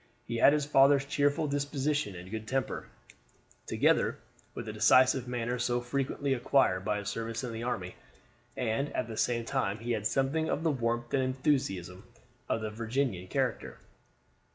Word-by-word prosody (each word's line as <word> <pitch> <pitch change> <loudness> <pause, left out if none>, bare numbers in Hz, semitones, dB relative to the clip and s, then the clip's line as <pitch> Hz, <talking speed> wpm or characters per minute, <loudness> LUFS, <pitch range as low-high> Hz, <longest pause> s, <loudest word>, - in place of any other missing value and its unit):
He 115 - -3
had 135 - +7
his 150 -1 +1
father's 140 -1 +5
cheerful 145 +2 +1
disposition 145 -4 -1
and 90 +2 -10
good 110 0 -5
temper, 130 +1 -2 0.8
together - - +2 0.4
with 120 - -5
the 110 - -5
decisive 130 +4 +4
manner 120 0 -2
so 120 0 +1
frequently 135 +2 -1
acquired 120 -7 +2
by 105 0 0
a 100 - -6
service 115 +4 -3
in 120 -2 -4
the 115 - -5
army, 95 -7 -3 0.6
and 125 +4 -1
at 125 - -1
the 115 - -6
same 115 +1 0
time 115 -6 -1
he 115 +2 -4
had 110 -2 0
something 140 +6 0
of 155 - -1
the 165 - +3
warmth 120 -2 -2
and 135 - +3
enthusiasm 130 - -1 0.5
of 115 - 0
the 110 -1 -3
Virginian 115 -4 -2
character. 130 +2 -2
125 Hz, 165 wpm, -30 LUFS, 110-140 Hz, 0.8 s, had